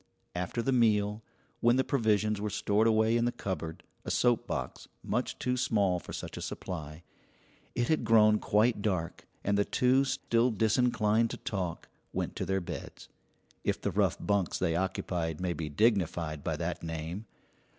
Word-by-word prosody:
After 90 Hz, +7 st, -2 dB
the 135 Hz, -, +1 dB
meal, 105 Hz, -3 st, +2 dB, 0.4 s
when 120 Hz, +1 st, +4 dB
the 130 Hz, -, +3 dB
provisions 110 Hz, -5 st, +1 dB
were 105 Hz, -, -1 dB
stored 105 Hz, +1 st, +2 dB
away 110 Hz, 0 st, +3 dB
in 120 Hz, -, +2 dB
the 120 Hz, -, +1 dB
cupboard 85 Hz, -8 st, -5 dB, 0.2 s
(a -, -, -5 dB
soap 120 Hz, -2 st, +2 dB
box) -, -, -4 dB, 0.2 s
much -, -, -1 dB
too 125 Hz, 0 st, 0 dB
small 100 Hz, -7 st, +1 dB
for -, -, -10 dB
such -, -, -6 dB
a -, -, -5 dB
supply, 80 Hz, -3 st, -6 dB, 0.7 s
it 120 Hz, -1 st, +1 dB
had 155 Hz, -5 st, +1 dB
grown 110 Hz, -1 st, +5 dB
quite 105 Hz, +1 st, +2 dB
dark, 90 Hz, -6 st, -2 dB, 0.2 s
and 100 Hz, 0 st, +1 dB
the -, -, +5 dB
two, 130 Hz, +5 st, +3 dB
still 120 Hz, -2 st, +1 dB
disinclined 110 Hz, 0 st, +2 dB
to -, -, -5 dB
talk, 90 Hz, -5 st, -4 dB, 0.3 s
went -, -, -2 dB
to 95 Hz, -, -2 dB
their 95 Hz, 0 st, +1 dB
beds 85 Hz, -, -8 dB, 0.5 s
if -, -, 0 dB
the -, -, -2 dB
rough -, -, +2 dB
bunks 100 Hz, -3 st, 0 dB
they 85 Hz, -3 st, 0 dB
occupied 85 Hz, -3 st, -2 dB
may 90 Hz, -1 st, -1 dB
be 80 Hz, -2 st, -4 dB
dignified 85 Hz, -4 st, +1 dB
by 80 Hz, -, -1 dB
that 85 Hz, +2 st, -3 dB
name. 80 Hz, +6 st, -5 dB
105 Hz, 170 wpm, -30 LUFS, 90-115 Hz, 0.7 s, grown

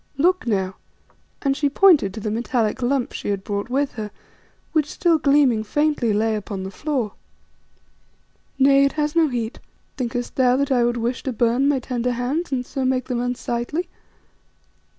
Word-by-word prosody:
Look 355 Hz, 0 st, +2 dB
now;" 190 Hz, -4 st, -1 dB, 0.7 s
and 275 Hz, -1 st, +2 dB
she 290 Hz, 0 st, +1 dB
pointed 295 Hz, -, +5 dB
to -, -, -5 dB
the 215 Hz, 0 st, -3 dB
metallic 230 Hz, 0 st, -1 dB
lump 250 Hz, 0 st, 0 dB
she -, -, -5 dB
had 200 Hz, -1 st, -2 dB
brought 200 Hz, +2 st, -3 dB
with 275 Hz, +2 st, 0 dB
her, 215 Hz, -2 st, -5 dB, 0.6 s
which, 305 Hz, -2 st, +1 dB
still 335 Hz, -1 st, +2 dB
gleaming 275 Hz, -6 st, +3 dB
faintly, 295 Hz, 0 st, +1 dB
lay 215 Hz, +1 st, +1 dB
upon 200 Hz, -2 st, -5 dB
the 190 Hz, -, -6 dB
floor. 255 Hz, -3 st, -2 dB, 1.5 s
"Nay, 275 Hz, +1 st, +5 dB
it 275 Hz, -, +2 dB
has 300 Hz, 0 st, -1 dB
no 330 Hz, -2 st, +4 dB
heat. 235 Hz, -4 st, -3 dB, 0.4 s
Thinkest 245 Hz, -2 st, -3 dB
thou 255 Hz, -1 st, +4 dB
that 280 Hz, 0 st, 0 dB
I 245 Hz, -2 st, +3 dB
would 240 Hz, 0 st, 0 dB
wish 235 Hz, +2 st, -2 dB
to 265 Hz, -, -3 dB
burn 240 Hz, +3 st, +2 dB
my 290 Hz, -1 st, +3 dB
tender 250 Hz, -1 st, -2 dB
hands 270 Hz, +9 st, -2 dB
and 250 Hz, -2 st, -1 dB
so 270 Hz, -, -3 dB
make 255 Hz, -1 st, +1 dB
them 250 Hz, -2 st, -2 dB
unsightly? 245 Hz, +6 st, -2 dB
250 Hz, 170 wpm, -22 LUFS, 230-280 Hz, 1.5 s, pointed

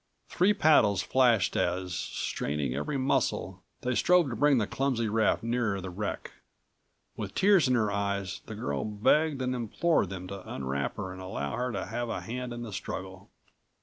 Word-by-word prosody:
Three 200 Hz, +4 st, +3 dB
paddles 145 Hz, -, +4 dB
flashed 120 Hz, -7 st, +3 dB
as, 90 Hz, +1 st, 0 dB
straining 75 Hz, -5 st, -2 dB
every 75 Hz, -, -2 dB
muscle, 110 Hz, -8 st, 0 dB, 0.2 s
they 125 Hz, -, -1 dB
strove 175 Hz, +1 st, +4 dB
to -, -, -3 dB
bring 145 Hz, +2 st, +4 dB
the 110 Hz, -, +2 dB
clumsy 130 Hz, -2 st, -1 dB
raft 110 Hz, +1 st, +1 dB
nearer 115 Hz, -4 st, 0 dB
the 95 Hz, 0 st, -6 dB
wreck. 105 Hz, +3 st, -4 dB, 0.8 s
With -, -, -6 dB
tears 195 Hz, -6 st, +5 dB
in 125 Hz, -, +3 dB
her 110 Hz, -3 st, +1 dB
eyes, 100 Hz, -2 st, -2 dB
the -, -, -6 dB
girl 70 Hz, -1 st, -2 dB
begged 130 Hz, +7 st, +2 dB
and 125 Hz, 0 st, 0 dB
implored 125 Hz, -, +1 dB
them 95 Hz, -1 st, -6 dB
to 100 Hz, -1 st, -8 dB
unwrap 70 Hz, +1 st, -3 dB
her 95 Hz, -3 st, -4 dB
and 95 Hz, -, -9 dB
allow 95 Hz, -3 st, -4 dB
her 125 Hz, +2 st, -1 dB
to 100 Hz, -, -3 dB
have 120 Hz, +3 st, -3 dB
a -, -, -3 dB
hand 125 Hz, +1 st, -5 dB
in 120 Hz, 0 st, -5 dB
the 110 Hz, -3 st, -7 dB
struggle. 95 Hz, +1 st, -6 dB
110 Hz, 180 wpm, -29 LUFS, 95-125 Hz, 0.8 s, tears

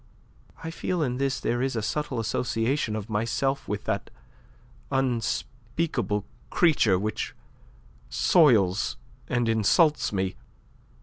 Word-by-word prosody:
I 165 Hz, -, -4 dB
feel 180 Hz, +2 st, -2 dB
that -, -, +3 dB
in 125 Hz, -1 st, -2 dB
this 135 Hz, 0 st, 0 dB
there 120 Hz, +1 st, -1 dB
is 130 Hz, -1 st, -1 dB
a 110 Hz, -, -1 dB
subtle 140 Hz, +1 st, -2 dB
association 115 Hz, +1 st, 0 dB
of 105 Hz, -1 st, -4 dB
myself 115 Hz, +5 st, -1 dB
with 105 Hz, 0 st, -3 dB
that -, -, -2 dB, 0.8 s
unspeakable 125 Hz, -, -1 dB, 0.2 s
creature 140 Hz, -, +4 dB
which 105 Hz, +3 st, -3 dB, 0.7 s
soils 105 Hz, -, +3 dB, 0.3 s
and 120 Hz, -1 st, 0 dB
insults 115 Hz, -, +3 dB
me. 95 Hz, -2 st, -2 dB
120 Hz, 115 wpm, -26 LUFS, 105-135 Hz, 0.8 s, creature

